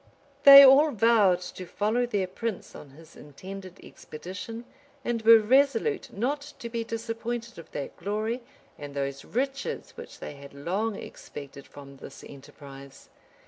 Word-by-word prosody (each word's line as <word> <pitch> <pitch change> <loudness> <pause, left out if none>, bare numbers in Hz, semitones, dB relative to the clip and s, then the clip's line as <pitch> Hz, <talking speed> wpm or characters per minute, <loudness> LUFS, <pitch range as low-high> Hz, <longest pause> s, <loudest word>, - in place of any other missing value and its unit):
they 275 0 +12
all 275 +4 +7
vowed 215 -6 +3
to 180 0 -8
follow 220 +6 -1
their 205 -5 -1
prince 205 +2 -6
on 145 - -12
his 155 +4 -17
intended 185 +5 -11
expedition, 195 +9 -9 0.4
and 235 -1 -1
were 225 +1 +8
resolute 275 - +1
not 260 +7 -2 0.2
to 235 - -7
be 230 0 -3
disappointed 230 0 -5
of 165 - -13
that 140 - -6
glory 215 +4 -3 0.4
and 145 -1 -9
those 140 0 -4
riches 275 - -4
which - - -12
they - - -8
had 140 0 -13
long 195 +9 -2
expected 140 -6 -10
from 140 -1 -13
this - - -12
enterprise. 140 -1 -13
210 Hz, 140 wpm, -27 LUFS, 150-235 Hz, 0.4 s, they